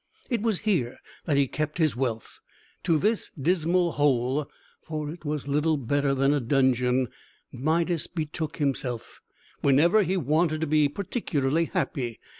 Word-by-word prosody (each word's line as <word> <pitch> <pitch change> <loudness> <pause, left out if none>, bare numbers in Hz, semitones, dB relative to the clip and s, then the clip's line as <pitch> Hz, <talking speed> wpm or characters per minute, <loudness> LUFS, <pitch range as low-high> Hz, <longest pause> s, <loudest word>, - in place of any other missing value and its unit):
It 235 -3 +1
was 220 -4 0
here 170 - 0 0.3
that 145 -3 +1
he 140 -1 +3
kept 155 +4 -3
his 155 -8 +2
wealth. 120 -3 -3 0.5
To 165 -3 +3
this 215 +6 0
dismal 170 +3 +2
hole 140 0 +1 0.3
for 155 -2 -4
it 165 0 -11
was 150 -2 -3
little 150 +2 +2
better 140 +2 0
than 135 +2 +3
a 145 - +2
dungeon 130 0 +2 0.4
Midas 160 +4 0
betook 155 -1 -4
himself, 130 -5 -2 0.4
whenever 165 +10 +5
he 190 0 0
wanted 155 +1 +1
to - - +1
be 150 -1 +3
particularly 165 - -1
happy. 120 -7 -2
150 Hz, 145 wpm, -26 LUFS, 135-165 Hz, 0.5 s, whenever